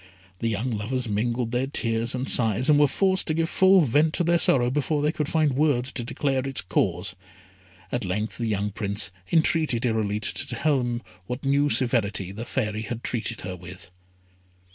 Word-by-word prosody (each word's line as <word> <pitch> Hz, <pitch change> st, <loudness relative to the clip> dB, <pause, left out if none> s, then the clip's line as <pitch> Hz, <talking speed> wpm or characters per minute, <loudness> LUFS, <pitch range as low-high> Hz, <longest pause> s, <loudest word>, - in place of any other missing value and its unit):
The 115 Hz, -, -1 dB
young 115 Hz, +3 st, -1 dB
lovers 120 Hz, +4 st, -2 dB
mingled 115 Hz, +3 st, -1 dB
their 125 Hz, +2 st, 0 dB
tears 115 Hz, -3 st, -1 dB
and 130 Hz, +2 st, -3 dB
sighs, 115 Hz, +3 st, +3 dB
and 145 Hz, -, +5 dB
were 145 Hz, -, +5 dB
forced 190 Hz, +6 st, +1 dB
to 155 Hz, -, 0 dB
give 165 Hz, 0 st, -1 dB
full 190 Hz, 0 st, +5 dB
vent 150 Hz, +3 st, +2 dB
to 175 Hz, -, +1 dB
their 170 Hz, 0 st, +2 dB
sorrow 125 Hz, -5 st, +3 dB
before 145 Hz, +2 st, 0 dB
they 150 Hz, -, +2 dB
could 150 Hz, -2 st, -3 dB
find 155 Hz, -4 st, +2 dB
words 135 Hz, -3 st, +1 dB
to 120 Hz, -, -3 dB
declare 135 Hz, +2 st, -1 dB
its 135 Hz, -, -1 dB
cause. 90 Hz, 0 st, -1 dB, 0.8 s
At 125 Hz, -, -1 dB
length 105 Hz, +5 st, -3 dB
the 115 Hz, -, -1 dB
young 105 Hz, -1 st, -1 dB
Prince 100 Hz, 0 st, -1 dB, 0.2 s
entreated 160 Hz, -7 st, +2 dB
Irolite 105 Hz, -2 st, -1 dB
to -, -, -2 dB
tell 140 Hz, +4 st, +1 dB
him 120 Hz, -1 st, -3 dB, 0.2 s
what 125 Hz, +2 st, -5 dB
new 140 Hz, +1 st, +2 dB
severity 105 Hz, -8 st, +1 dB
the 110 Hz, +4 st, -7 dB
Fairy 110 Hz, -5 st, -2 dB
had 115 Hz, +2 st, -6 dB
treated 115 Hz, -2 st, -3 dB
her 90 Hz, 0 st, -5 dB
with. 90 Hz, 0 st, -10 dB
120 Hz, 185 wpm, -25 LUFS, 110-145 Hz, 0.8 s, and